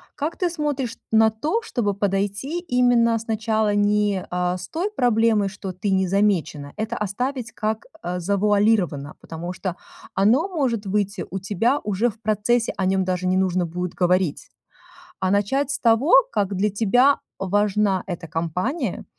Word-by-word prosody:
Как 305 +2 -3
ты 360 - 0
смотришь 290 -7 -3
на 220 0 +5
то, 305 - -1
чтобы 225 - -1
подойти 205 - -1
именно 245 -7 +3
сначала 220 -1 0
не, 205 -2 +2
э, 180 0 -1
с 180 0 -8
той 365 +6 -2
проблемой, 225 - +2
что 195 -1 -7
ты 185 +3 -3
не 190 0 +2
замечена. 180 -7 0
Это 220 +2 -3
оставить 245 +5 -3
как, 220 0 -3 0.2
э, 180 +1 -3
завуалировано. 200 -5 +1
Потому 170 +2 -6
что 185 0 -4 0.4
оно 235 - +3
может 255 - -1
выйти 200 0 -1
у 195 - -3
тебя 210 +8 +1
уже 210 +3 +1
в 220 0 -13
процессе, 220 +2 +1
о 190 - 0
нем 190 0 +2
даже 185 0 -1
не 185 +1 +2
нужно 185 -1 +1
будет 180 +1 -4
говорить. 180 -3 0 0.7
А 185 -1 +1
начать 210 +8 +1
с 280 - -1
того, 235 +7 +3 0.2
как 200 -1 0
для 205 +3 +1
тебя 245 +7 +3 0.2
важна 200 0 +1
эта 175 -2 -5
компания. 180 - -2
205 Hz, 155 wpm, -23 LUFS, 185-235 Hz, 0.7 s, на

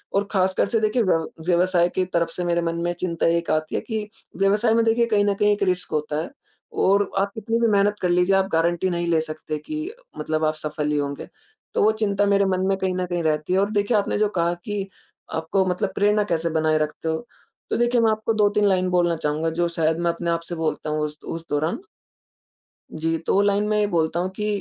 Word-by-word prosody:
और 200 0 +1
ख़ासकर 190 -1 +2
से 225 - +2
देखिए 215 +3 +1
व्यव 165 -4 +1 0.2
व्यवसाय 175 0 +3
की 185 - +2
तरफ 170 -2 0
से 180 - -4
मेरे 170 0 +1
मन 165 0 -1
में 175 - 0
चिंता 170 -3 0
एक 170 - -4
आती 155 0 -1
है - - 0
कि 215 -2 -4 0.3
व्यवसाय 210 +4 +3
में 230 - +3
देखिए 230 +1 +3
कहीं 210 -2 +2
न 205 - +2
कहीं 210 +1 +3
एक 205 - -2
रिस्क 180 -2 0
होता 150 0 -1
है। - - -7 0.5
और 200 0 +3
आप 200 +1 0
कितनी 225 +2 -1
भी 230 - +4
मेहनत 205 0 +3
कर 180 - +1
लीजिए 180 +2 +3
आप 190 0 +2
गारंटी 170 +3 +1
नहीं 175 -1 -2
ले 165 -2 +2
सकते 155 -1 -5
कि 310 0 -4 0.4
मतलब 155 0 -2
आप 155 - +1
सफल 150 -1 -3
ही 150 - +1
होंगे। 140 -1 -3 0.5
तो - - +2
वो 215 - +5
चिंता 205 -1 +2
मेरे 200 0 +3
मन 185 0 0
में 195 - +1
कहीं 190 -1 -1
न 185 - -1
कहीं 175 -1 -2
रहती 155 +2 0
है। 190 - +3
और 200 +2 +1
देखिए 205 +2 +1
आपने 205 - 0
जो 210 -1 +2
कहा 170 +1 +2
कि 205 -2 -3 0.5
आपको 185 +4 0
मतलब 180 -1 -1
प्रेरणा 210 +1 +3
कैसे 165 0 0
बनाए 155 0 +2
रखते 155 +1 -3
हो। 160 +9 -3 0.4
तो - - 0
देखिए 240 0 +2
मैं 225 - +4
आपको 220 +1 -1
2-3 210 -1 +2
लाइन 185 -2 +2
बोलना 175 -2 +2
चाहूँगा 155 +1 -1
जो 175 - +3
शायद 160 0 +2
मैं 170 0 +1
अपने 170 0 -4
आप 165 - 0
से 175 - -3
बोलता 160 -1 -2
हूँ 150 0 -1
उस 150 0 -7
उस 165 0 -6
दौरान। 155 - -1 1.1
जी 165 +1 -1
तो 165 - -2
वो 195 - +4
लाइन 205 +1 +2
में 215 0 +1
ये 210 - +3
बोलता 165 -2 0
हूँ 185 +1 -1
कि 210 - -2
185 Hz, 235 wpm, -23 LUFS, 165-205 Hz, 1.1 s, वो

